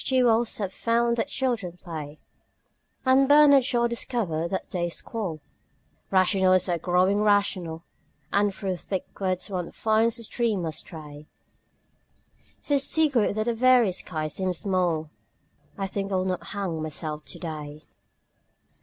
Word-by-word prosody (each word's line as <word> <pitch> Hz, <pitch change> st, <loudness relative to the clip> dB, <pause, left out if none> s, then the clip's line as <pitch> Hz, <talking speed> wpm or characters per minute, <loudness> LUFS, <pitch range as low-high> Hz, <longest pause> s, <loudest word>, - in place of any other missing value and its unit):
G. 260 Hz, -1 st, +2 dB
Wells 230 Hz, -1 st, +2 dB
has 195 Hz, -3 st, -3 dB
found 235 Hz, +1 st, +1 dB
that 230 Hz, -, 0 dB
children 235 Hz, -11 st, -2 dB
play, 155 Hz, -4 st, -7 dB, 0.9 s
And 265 Hz, +1 st, +5 dB
Bernard 290 Hz, -2 st, +7 dB
Shaw 240 Hz, -2 st, +1 dB
discovered 215 Hz, -9 st, -2 dB
that 190 Hz, -, -3 dB
they 175 Hz, -1 st, -1 dB
squall; 175 Hz, -4 st, -4 dB, 0.7 s
Rationalists 185 Hz, -1 st, +3 dB
are 170 Hz, -1 st, 0 dB
growing 185 Hz, +4 st, +2 dB
rational 190 Hz, -6 st, +1 dB, 0.5 s
And 205 Hz, 0 st, +3 dB
through 190 Hz, -2 st, -3 dB
thick 185 Hz, +2 st, -4 dB
woods 185 Hz, -2 st, -1 dB
one 180 Hz, -4 st, -4 dB
finds 220 Hz, +1 st, +1 dB
a 230 Hz, -, -6 dB
stream 220 Hz, -5 st, -1 dB
astray, 150 Hz, -2 st, -7 dB, 1.3 s
So 285 Hz, -1 st, +1 dB
secret 280 Hz, -8 st, +2 dB
that 215 Hz, -, 0 dB
the 235 Hz, -, +1 dB
very 245 Hz, -3 st, +4 dB
sky 155 Hz, -3 st, -4 dB
seems 185 Hz, +3 st, -2 dB
small 175 Hz, -6 st, 0 dB, 0.7 s
I 195 Hz, -, -2 dB
think 195 Hz, +1 st, -4 dB
I -, -, +1 dB
will 185 Hz, 0 st, 0 dB
not 185 Hz, -1 st, -2 dB
hang 185 Hz, -6 st, -3 dB
myself 155 Hz, 0 st, -5 dB
today. 155 Hz, -3 st, -7 dB
195 Hz, 135 wpm, -26 LUFS, 170-230 Hz, 1.3 s, Bernard